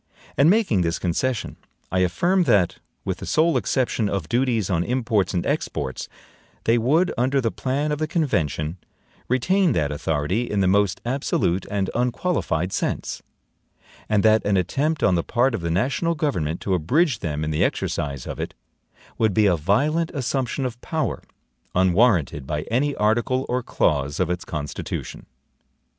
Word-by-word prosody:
And 140 +3 +5
making 190 - +3
this 85 0 0
concession, 110 +7 -2 0.3
I 95 - +1
affirm 175 - +2
that 95 - +2 0.3
(with - - -2
the - - -7
sole 160 +2 +3
exception 120 -5 0
of 95 -6 -2
duties 120 -4 +1
on 85 -3 +1
imports 115 -5 0
and 85 - 0
exports) 65 -2 -3 0.5
they 115 +1 +3
would, 155 +10 +2
under 130 +3 +2
the 115 -4 0
plan 140 +3 -1
of 150 - -1
the 155 - 0
convention, 85 - -1 0.5
retain 175 +7 +2
that 75 -6 0
authority 80 +9 -1
in 105 - 0
the 95 - +3
most 100 0 +2
absolute 115 -8 0
and 100 -2 -1
unqualified 120 - -1
sense; - - -2 0.9
and 105 -2 +2
that 110 0 +4
an 100 -1 +2
attempt 140 - 0
on - - +4
the 85 -1 +1
part 125 +2 +1
of 110 - -2
the 85 - -2
national 130 - 0
government 90 - -1
to 95 - -1
abridge 125 - +2
them 75 -2 -3
in 75 - -2
the 75 - +1
exercise 70 -4 -2
of - - -6
it, - - -4 0.6
would 110 -4 +2
be 110 - +4
a 95 -3 +4
violent 145 - +1
assumption 130 0 -1
of 120 -1 -5
power, 155 -3 -2 0.5
unwarranted 90 - +3
by 75 0 -2
any 140 +4 +1
article 120 +5 +1
or 125 +1 0
clause 70 - 0
of 90 -2 +1
its 90 +1 -3
Constitution. 75 -2 -5
110 Hz, 160 wpm, -23 LUFS, 85-135 Hz, 0.9 s, And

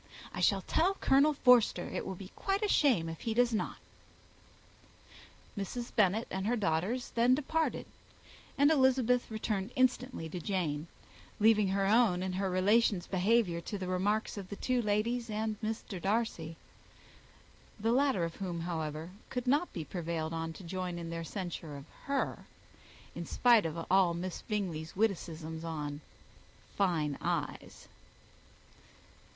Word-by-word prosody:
I - - -5
shall 195 -2 +3
tell 370 - +2
Colonel 285 -2 +4
Forster 245 -9 +4
it - - -4
will 190 - -4
be 185 +1 -10
quite 395 +2 -1
a - - +2
shame 250 - +3
if 165 -1 -6
he 225 -1 -2
does 245 0 +3
not." 215 - -1 1.8
Mrs. 235 +4 -5
Bennet 210 +1 +3
and 190 +1 -2
her 240 - +2
daughters 205 +4 -1
then 240 +2 +4
departed, 315 +3 -1 0.7
and 285 +2 +5
Elizabeth 260 -4 +3
returned 215 -2 -2
instantly 255 - +1
to 180 - -5
Jane, 165 -5 -2 0.5
leaving 215 -1 +5
her 195 +1 +1
own 205 -4 +3
and 190 -1 -2
her 190 +1 -1
relations' 195 +1 +3
behaviour 190 -2 +2
to 205 - -5
the 185 -1 -5
remarks 205 +4 0
of 190 -2 -9
the 205 - -5
two 250 +3 0
ladies 230 +3 0
and 215 0 -2
Mr. 215 -4 -4
Darcy; 195 -6 -1 1.2
the 225 +2 +1
latter 260 -7 +2
of 165 0 -4
whom, 175 -4 -4
however, 160 -1 -4 0.2
could 250 -1 -3
not 290 +7 +2
be 165 -4 -5
prevailed 165 -2 -3
on 165 0 -3
to 190 - -11
join 180 0 -4
in 170 -1 -5
their 165 0 -4
censure 170 -4 -5
of 140 - -10 0.2
her, 280 -1 -2 0.7
in - - -6
spite 235 -7 +4
of 165 +1 -5
all 185 -3 +4
Miss 180 +1 -4
Bingley's 175 -7 -3
witticisms 165 -6 -2
on 150 -3 -4 0.7
fine 160 -7 0
eyes. - - -3
195 Hz, 145 wpm, -32 LUFS, 170-235 Hz, 1.8 s, and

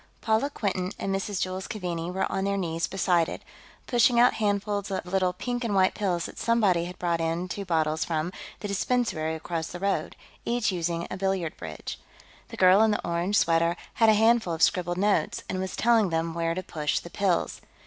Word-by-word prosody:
Paula 220 +5 +1
Quinton 190 -8 -2
and 195 - -2
Mrs. 195 0 -2
Jules 185 +1 -4
Keaveney 175 -5 -4
were 190 +1 -1
on 190 - -1
their 200 0 0
knees 165 -3 -1
beside 175 -3 +1
it, - - -7 0.4
pushing 240 -1 +4
out 245 +1 +6
handfuls 205 -1 -1
of 190 - -3
little 185 0 +1
pink 245 +7 -4
and 215 -4 -1
white 190 -1 +4
pills 180 -4 -1
that - - -8
somebody 205 -7 +2
had 180 +1 -8
brought 170 -2 0
in 165 +2 -1
two 200 +2 -5
bottles 160 -3 +1
from 165 +2 -2 0.3
the 205 - -3
dispensary 200 -6 0
across 160 0 -4
the 175 - -7
road, 195 +1 -1 0.3
each 235 -2 0
using 170 -1 -2
a - - -4
billiard 190 -4 -1
bridge. 80 -2 -7 0.5
The - - -10
girl 185 +2 +6
in 220 - +5
the 210 - -1
orange 175 +4 0
sweater 165 +1 +3 0.2
had 225 -1 +4
a 215 - +6
handful 220 -5 +3
of 160 - 0
scribbled 175 -2 +2
notes, 205 +2 +1
and 185 - -3
was 190 0 -3
telling 225 -4 +3
them 165 0 -1
where 165 0 -1
to 185 - -3
push 150 -4 -2
the 170 - -6
pills. 190 -3 0
185 Hz, 200 wpm, -27 LUFS, 170-205 Hz, 0.5 s, out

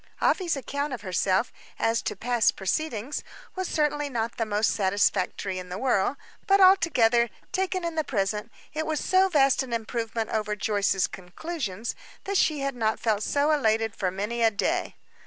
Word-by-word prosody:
Afy's 355 -5 +2
account 280 +1 -3
of 240 - -5
herself, 190 +3 +1 0.2
as 225 +1 +1
to - - -3
past 240 +2 +2
proceedings, 240 - -2 0.3
was 375 -1 -2
certainly 295 -1 0
not 230 -2 -3
the 225 - -1
most 210 +1 +2
satisfactory 190 -1 0
in 180 0 -9
the 180 - -4
world; 245 +1 +1 0.3
but, 395 -1 +5
altogether, 250 -12 +5 0.2
taken 370 -1 -1
in 335 - -2
the 315 -1 0
present, 210 -3 -2 0.2
it 315 +1 -2
was 310 -2 0
so 375 +1 +3
vast 275 -6 +4
an 255 -3 -5
improvement 225 0 -3
upon 210 -1 -1
Joyce's 200 -2 +1
conclusions, 215 - -5 0.3
that 400 - -3
she 305 -5 +2
had 275 -1 -2
not 220 -2 0
felt 215 -3 0
so 285 +7 +1
elated 225 -7 +1
for 190 -3 0
many 210 +6 -3
a 225 - +6
day. 205 - -1
235 Hz, 170 wpm, -26 LUFS, 210-300 Hz, 0.3 s, a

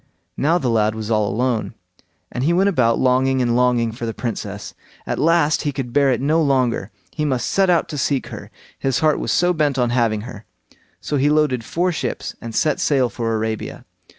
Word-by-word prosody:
Now 160 +5 +2
the 135 - -2
lad 110 -1 +1
was 110 0 -5
all 105 -2 +2
alone, 120 +2 -1 0.6
and 125 - -3
he 165 +5 +2
went 190 +3 +3
about 120 -10 +2
longing 130 +1 +2
and 120 -2 +1
longing 125 -2 +2
for 115 +1 -6
the 115 - -4
Princess; 105 -4 -5 0.3
at - - -3
last 165 -1 +3
he 145 - -1
could 130 -3 -5
bear 140 -1 +4
it 125 - 0
no 155 +5 +2
longer; 130 -8 +1 0.2
he 150 - -3
must 130 -5 0
set 195 -1 +2
out 170 -2 +3
to 150 - -4
seek 135 +1 0
her, - - -9 0.3
his 135 -3 0
heart 155 -1 +3
was - - -2
so 180 +1 +3
bent 150 -4 0
on 120 -2 +1
having 115 -4 +1
her. 110 -2 -10 0.6
So 145 - -2
he 140 +2 +2
loaded 150 -5 +2
four 180 +9 0
ships 140 -8 -4
and 115 -1 -7
set 150 -2 +1
sail 135 -4 +2
for 115 -2 -2
Arabia. 110 0 -4
130 Hz, 205 wpm, -20 LUFS, 115-150 Hz, 0.6 s, bear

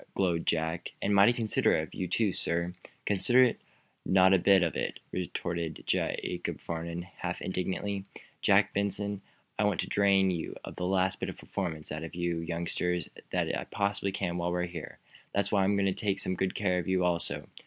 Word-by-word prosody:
glowed 85 -4 +1
Jack. 80 +1 0
"And 100 - 0
mighty 100 +4 +7
considerate 115 -3 +2
of - - -10
you, 90 - -3
too, 100 +2 +1
sir." 85 +1 -1 0.3
"Considerate? 120 +5 +4 0.4
Not 95 0 +5
a 95 - +5
bit 95 +1 +5
of - - -1
it!" - - -2
retorted 85 -2 -3
Jacob - - -1
Farnum, 85 +1 -4 0.2
half 90 0 -3
indignantly. 95 +2 -2 0.4
"Jack - - +4
Benson, 100 0 -1 0.4
I - - +4
want 105 -4 +1
to - - -4
drain 100 -1 +4
the 90 +1 -4
last 95 0 +1
bit - - -2
of - - -7
performance 80 -6 -4
out 75 +1 -4
of 80 - -7
you 85 -1 -1
youngsters 85 0 -2 0.2
that - - 0
I - - -3
possibly 100 -1 0
can 90 -2 -2
while 85 0 -1
we're 90 0 0
here. 85 -3 -8 0.4
That's 100 - +1
why 100 - +3
I - - +3
am 100 +1 +2
going 100 -1 +2
to 95 - +2
take 100 0 0
some 95 - 0
good 95 +1 -1
care 90 -3 +1
of 90 - -4
you, 95 -1 +2
also. 85 -1 0
95 Hz, 185 wpm, -30 LUFS, 85-100 Hz, 0.4 s, mighty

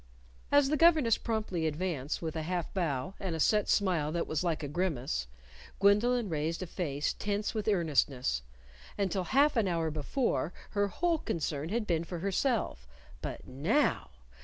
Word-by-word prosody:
As 285 -1 +5
the 305 - +2
governess 310 -8 +5
promptly 210 -8 -1
advanced, 155 -2 -2
with 160 -1 -3
a 160 - -1
half 175 +1 -3
bow, 170 -2 -1
and 185 -4 -3
a - - -4
set 210 +5 +3
smile 175 -7 +2
that 170 - 0
was 155 +2 -2
like 165 -3 -1
a - - -2
grimace, 140 - -1 0.5
Gwendolyn 210 +4 +4
raised 160 +1 -2
a - - -3
face 150 -5 -2
tense 205 0 -2
with 215 -2 -3
earnestness. 145 - +1 0.6
Until 190 -2 0
half 285 +6 +3
an 225 -4 +2
hour 165 -3 0
before, 155 - -1 0.2
her 205 0 +1
whole 335 - 0
concern 155 - -2
had 225 +2 -1
been 170 -4 0
for 175 +1 -6
herself. 195 - -1 0.3
But - - -5
now! 170 - +1
180 Hz, 160 wpm, -31 LUFS, 155-210 Hz, 0.6 s, As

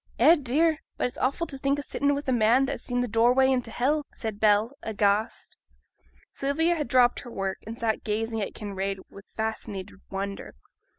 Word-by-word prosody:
'Eh, 290 +8 +7
dear! 305 +3 +1 0.2
but - - 0
it's 250 - -3
awful 275 +6 0
t' 275 -4 -6
think 275 +1 +1
o' 285 - -4
sitting 285 0 0
wi' 285 - -3
a 260 - 0
man 240 +2 +4
that 270 - -2
has - - -5
seen 245 0 -1
th' - - -12
doorway 245 +4 +4
into 250 -3 0
hell,' 285 +7 0
said 220 -3 -5
Bell, 215 +2 +4
aghast. 210 0 0 0.7
Sylvia 320 +5 +1
had 300 -5 -2
dropped 245 0 +4
her 245 - -9
work, 195 -3 -3
and 230 +1 -7
sat 225 -2 -1
gazing 225 +1 -2
at 200 - -4
Kinraid 195 -2 -3
with 200 - -13
fascinated 215 -3 -4
wonder. 195 0 -5
235 Hz, 190 wpm, -27 LUFS, 210-275 Hz, 0.7 s, Eh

